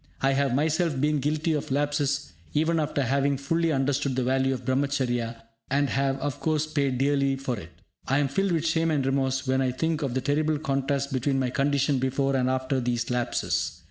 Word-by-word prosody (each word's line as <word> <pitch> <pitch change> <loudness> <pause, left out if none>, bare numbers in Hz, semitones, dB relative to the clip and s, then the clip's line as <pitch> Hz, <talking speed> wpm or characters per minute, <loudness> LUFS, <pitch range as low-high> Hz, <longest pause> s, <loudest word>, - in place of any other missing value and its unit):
I 135 - +2
have 135 -2 +1
myself 155 0 +1
been 150 +1 +2
guilty 155 +3 0
of 150 - -2
lapses 145 -2 0 0.2
even 160 +2 +2
after 145 -2 0
having 140 +2 +1
fully 165 +4 0
understood 140 -1 0
the 130 - 0
value 130 +1 +1
of 125 -2 -4
Brahmacharya, 125 -4 -1 0.3
and 140 +1 +1
have, 135 0 +1
of 140 0 -3
course, 155 0 0
paid 140 -4 0
dearly 140 0 +2
for 135 -4 -3
it. 90 - -10 0.4
I 135 - +2
am 145 -1 +2
filled 195 +8 0
with 165 -2 0
shame 165 0 +2
and 145 -4 +1
remorse 135 0 0
when 130 0 +1
I 130 - +1
think 160 +5 -1
of 135 -4 -2
the 130 - 0
terrible 150 +3 +1
contrast 140 -1 -1
between 135 +1 0
my 130 -2 0
condition 140 +1 +1
before 135 +1 0
and 130 -1 +1
after 130 +1 0
these 120 -1 -1
lapses. 125 -1 -1
140 Hz, 200 wpm, -26 LUFS, 130-145 Hz, 0.4 s, I